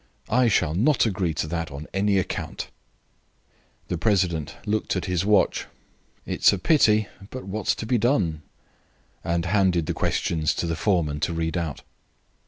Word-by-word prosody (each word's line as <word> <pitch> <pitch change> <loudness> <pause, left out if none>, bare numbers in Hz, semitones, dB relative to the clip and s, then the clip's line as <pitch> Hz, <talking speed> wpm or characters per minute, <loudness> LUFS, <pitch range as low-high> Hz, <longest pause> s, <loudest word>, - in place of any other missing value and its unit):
I, 125 +2 +4
shall 90 -8 +2
not 120 - +3
agree 95 -6 -1
to - - -2
that 85 -1 -3
on 70 +2 -7
any 100 0 +2
account." 95 - -3 1.2
The 90 - -3
president 85 -7 0
looked 110 0 -1
at - - -2
his 90 -2 0
watch. 105 -1 +2 0.6
"It - - -4
is - - +8
a 100 - -1
pity, 110 - +3 0.2
but 130 - -7
what's 105 +3 -1
to - - -5
be 120 +1 +1
done?" 100 - +1 0.8
and 85 0 -1
handed 90 -3 +2
the - - -2
questions 80 -2 0
to - - -2
the 85 -1 -1
foreman 80 -5 0
to 85 - -1
read 80 +1 -2
out. 85 -5 -3
90 Hz, 165 wpm, -24 LUFS, 80-105 Hz, 1.2 s, is